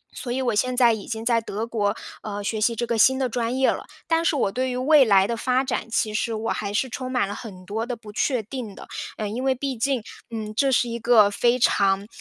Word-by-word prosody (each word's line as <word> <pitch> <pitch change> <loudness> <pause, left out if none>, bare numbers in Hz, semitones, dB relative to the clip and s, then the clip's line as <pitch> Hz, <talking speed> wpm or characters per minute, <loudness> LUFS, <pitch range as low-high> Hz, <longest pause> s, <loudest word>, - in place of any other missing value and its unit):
所 245 - -5
以 260 - -1
我 240 -3 +1
现 250 +4 0
在 240 -3 +6
已 215 -2 -6
经 225 -1 -4
在 230 -1 +3
德 220 +1 -4
国， 215 -2 -1 0.3
呃， 205 -1 -5
学 215 +1 -2
习 230 +2 +2
这 240 +2 -1
个 230 -1 -1
新 260 +4 +5
的 260 -1 0
专 240 +1 -2
业 265 - +4
了， - - -5 0.2
但 330 0 +2
是 325 - +2
我 220 -7 +1
对 255 +4 -1
于 250 - -3
未 285 +2 +6
来 195 -3 +5
的 230 +3 -2
发 255 +3 +1
展， 250 -3 -3
其 215 -1 0
实 225 +1 -1
我 225 +1 -2
还 200 -1 -3
是 235 +6 0
充 255 +2 -5
满 250 -6 +1
了 205 - -5
很 195 -4 -9
多 215 +4 -3
地 245 - -3
不 220 -2 -12
确 240 +2 0
定 225 -2 -7
的。 - - -11 0.3
呃， 215 - -2
因 235 +5 -4
为 265 -1 +2
毕 270 +1 -3
竟， 250 0 0 0.3
嗯， 215 -2 -5
这 270 +4 +2
是 245 -1 +3
一 235 0 -4
个 220 -3 +5
非 240 +4 +2
常 200 -4 +2
230 Hz, 280 characters per minute, -24 LUFS, 215-255 Hz, 0.3 s, 在